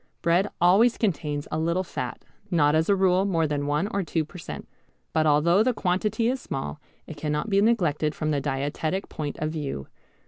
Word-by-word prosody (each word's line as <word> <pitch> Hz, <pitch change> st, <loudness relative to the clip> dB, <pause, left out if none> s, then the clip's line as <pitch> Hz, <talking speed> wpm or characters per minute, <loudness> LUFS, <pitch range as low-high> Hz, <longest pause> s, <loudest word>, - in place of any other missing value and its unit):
Bread 175 Hz, +4 st, +3 dB
always 200 Hz, +8 st, +5 dB
contains 150 Hz, -8 st, -1 dB
a 155 Hz, -, -1 dB
little 170 Hz, +3 st, 0 dB
fat, 125 Hz, -8 st, -6 dB, 0.2 s
not 150 Hz, -4 st, +3 dB
as 160 Hz, +3 st, +2 dB
a 200 Hz, -, +5 dB
rule 190 Hz, -1 st, +3 dB
more 170 Hz, -5 st, +1 dB
that 145 Hz, -1 st, -1 dB
one 150 Hz, +6 st, 0 dB
or 200 Hz, -, -1 dB
two 165 Hz, -2 st, -1 dB
per 180 Hz, +4 st, -11 dB
cent. -, -, -7 dB, 0.5 s
But 155 Hz, -1 st, +2 dB
although 165 Hz, +6 st, +4 dB
the 245 Hz, +1 st, +2 dB
quantity 210 Hz, +5 st, 0 dB
is 255 Hz, +1 st, -1 dB
small 75 Hz, -, -5 dB, 0.2 s
it 160 Hz, -, -9 dB
cannot 150 Hz, +7 st, -2 dB
be 200 Hz, 0 st, +4 dB
neglected 170 Hz, -9 st, +1 dB
from 155 Hz, -1 st, -1 dB
the 145 Hz, -2 st, 0 dB
dietetic 145 Hz, +6 st, -2 dB
point 150 Hz, -2 st, -5 dB
of 155 Hz, 0 st, -2 dB
view. 140 Hz, -, -5 dB
160 Hz, 195 wpm, -26 LUFS, 150-195 Hz, 0.5 s, always